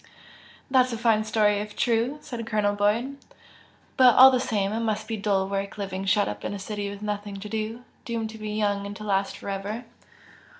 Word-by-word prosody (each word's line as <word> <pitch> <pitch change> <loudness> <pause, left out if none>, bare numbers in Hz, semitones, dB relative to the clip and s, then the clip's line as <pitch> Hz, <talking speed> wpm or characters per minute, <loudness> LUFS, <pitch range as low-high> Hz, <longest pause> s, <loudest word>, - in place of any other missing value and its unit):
"That's 255 -1 +4
a 230 - -3
fine 220 -2 +2
story 210 -1 +2
if 210 0 -6
true!" 235 +4 +1
said 235 -4 -6
Colonel 210 -2 +1
Boyd 220 +7 0 0.8
"But 255 -3 +7
all 265 +1 +10
the 255 - +2
same, 210 -5 -1
it 225 - -1
must 215 -1 -2
be 225 - -2
dull 200 -2 0
work 200 +1 -3
living 195 -1 -4
shut 205 +1 +3
up - - -5
in - - -3
a - - -4
city 205 +1 -4
with 200 +1 -8
nothing 205 -1 -4
to 210 - -7
do, 220 +3 -4 0.2
doomed 225 -2 -3
to 220 - -11
be 215 0 -5
young 205 -1 -1
and 205 - -7
to 215 - -9
last 195 -1 0
for - - -10
ever!" 205 +5 -4
210 Hz, 210 wpm, -26 LUFS, 205-230 Hz, 0.8 s, all